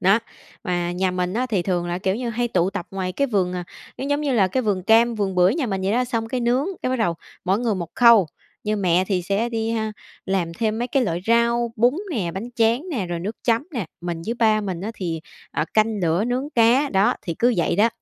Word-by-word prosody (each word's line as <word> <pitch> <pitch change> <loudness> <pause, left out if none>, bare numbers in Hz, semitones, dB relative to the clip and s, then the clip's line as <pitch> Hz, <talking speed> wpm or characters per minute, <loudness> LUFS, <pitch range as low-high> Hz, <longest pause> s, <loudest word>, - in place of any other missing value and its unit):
Đó. 195 +4 +5 0.5
Mà 175 -2 -1
nhà 185 +1 0
mình 180 +1 -2
á 250 +3 0
thì 205 -8 0
thường 175 -2 -1
là, 175 +1 -2
kiểu 190 0 0
như, 240 +2 -3
hay 240 +1 -1
tụ 180 -2 +1
tập 175 - -5
ngoài 185 -1 -3
cái 280 - 0
vườn 195 -7 0
à 180 -1 -4 0.3
cái 270 - -3
giống 285 +1 0
như 290 -2 0
là, 200 -6 +3
cái 255 +7 0
vườn 200 -4 0
cam, 230 +4 +4
vườn 200 -3 -1
bưởi 180 +5 +4
nhà 300 -6 -1
mình 195 -3 -2
vậy 195 +2 +1
đó. 250 +2 +2
Xong 230 -2 -2
cái 250 +2 -2
nướng, 245 +6 +1 0.2
cái 255 - 0
bắt 260 - +1
đầu 220 -8 +1 0.3
mỗi 190 +2 +2
người 230 -3 0
1 170 -3 -5
khâu, 235 -6 +6 0.4
như 215 0 0
mẹ 185 -2 +2
thì 185 -3 0
sẽ 200 +6 0
đi 225 -1 -2
ha, 220 -1 -1 0.3
làm 185 -3 0
thêm 220 +2 -1
mấy 240 +1 -2
cái 265 -2 +2
loại 170 -2 -1
rau, 235 0 +2
bún 240 +4 +4 0.2
nè, 195 - -1
bánh 215 +6 -5
tráng 230 +5 +2
nè, 220 - -2
rồi 170 -1 -3
nước 205 +6 -4
chấm 235 +5 +2
nè, 230 - -3
mình 170 -1 -4
với 230 - -1
ba 220 -2 +3
mình 185 -4 -4
á 210 - -3
thì, 170 -5 -3 0.3
ờ, - - -1
canh 215 -1 +2
lửa 170 +5 +2
nướng 255 +4 -2
cá. 245 +3 +4
Đó, 195 +1 +3
thì 170 - -3
cứ 240 0 +3
vậy 170 - +1
đó, 215 +4 +5
215 Hz, 255 wpm, -22 LUFS, 185-235 Hz, 0.5 s, khâu